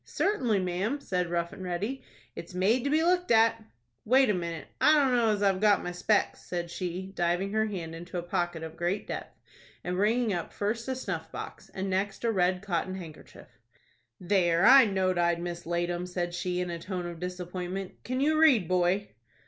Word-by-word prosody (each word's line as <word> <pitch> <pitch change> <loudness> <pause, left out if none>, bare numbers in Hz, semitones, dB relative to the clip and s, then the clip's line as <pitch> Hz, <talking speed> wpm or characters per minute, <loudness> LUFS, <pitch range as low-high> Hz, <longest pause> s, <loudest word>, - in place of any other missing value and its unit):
"Certainly, 255 - 0
ma'am," 185 +10 -1
said 180 -9 -2
Rough 170 0 -2
and 190 - -8
Ready; 195 +9 -3 0.3
"it's 170 +2 -8
made 215 +7 +2
to - - +1
be 310 +2 +3
looked 360 +1 +2
at." 225 0 +4 0.4
"Wait 260 0 +4
a - - +1
minute. 170 -3 -4
I 305 - +6
dunno 250 -5 +3
as 205 -1 0
I've 195 -2 +3
got 210 -2 +4
my 180 - -3
specs," 180 +4 0
said 170 -1 -4
she, 185 +2 -4
diving 175 +3 0
her 220 0 +2
hand 170 -6 -5
into 175 +2 -7
a 175 - -3
pocket 175 -1 -2
of 160 0 -7
great 175 +4 -2
depth, - - -7 0.5
and 180 +1 -2
bringing 220 +2 +2
up 175 -2 -4
first 220 +4 -2
a 260 - -1
snuff 260 - -5
box, - - -8
and 190 0 -2
next 195 +3 -2
a 230 - +2
red 185 -2 +1
cotton 185 -1 -2
handkerchief. 165 -5 -12 0.6
"There, 175 -2 +2
I 265 -1 +9
know'd 190 -3 0
I'd 170 0 +2
mislaid 175 0 -2
'em," 175 +1 -3
she 180 - -13 0.4
said, 180 - +1
in 175 - -5
a 170 - -5
tone 180 0 -4
of 170 -1 -6
disappointment. 180 +1 -5
"Can 255 +1 -2
you 310 +2 +3
read, 260 - +5
boy?" 185 +3 +1
185 Hz, 195 wpm, -28 LUFS, 175-220 Hz, 0.6 s, I